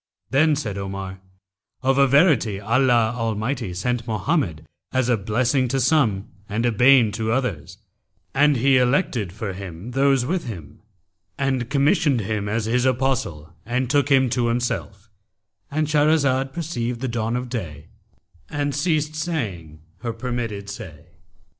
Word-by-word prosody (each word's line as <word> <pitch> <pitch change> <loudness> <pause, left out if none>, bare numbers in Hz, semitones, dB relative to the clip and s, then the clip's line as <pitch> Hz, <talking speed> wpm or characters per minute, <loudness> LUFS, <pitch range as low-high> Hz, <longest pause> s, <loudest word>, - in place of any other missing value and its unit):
Then 150 +3 +4
said 105 -9 -4
Omar, 95 -1 -6 0.6
'Of 135 +1 +2
a 140 - +6
verity 135 - +3
Allah 120 +1 +2
Almighty 115 -1 -2
sent 120 +5 -2
Mohammed 110 - -1 0.3
as 130 -1 +1
a 120 - +4
blessing 120 +5 +1
to 135 +2 0
some 125 -8 +2 0.2
and 110 +4 -1
a 120 - +3
bane 120 0 +5
to 110 +1 -2
others; 95 - -2 0.6
and 145 0 +4
He 135 +2 +4
elected 125 - +1
for 100 0 -5
him 95 +3 -8
those 135 -1 +2
with 175 +5 -1
him, 85 - -8 0.6
and 130 -3 -1
commissioned 145 - +2
him 105 0 -2
as 110 +1 -1
His 120 +2 +1
Apostle 120 - -1
and 125 +2 -1
took 145 -1 +2
him 135 -2 +4
to 120 -1 +1
Himself,'—And 115 +4 -4
Shahrazad 145 -3 +2
perceived 125 -8 -3
the 130 - -1
dawn 115 -1 -2
of 125 0 -3
day 85 - -6 0.6
and 145 -1 -2
ceased 155 0 0
saying 105 - -4 0.2
her 115 +2 -4
permitted 115 -4 -4
say. 80 -6 -9
120 Hz, 140 wpm, -22 LUFS, 105-135 Hz, 0.6 s, a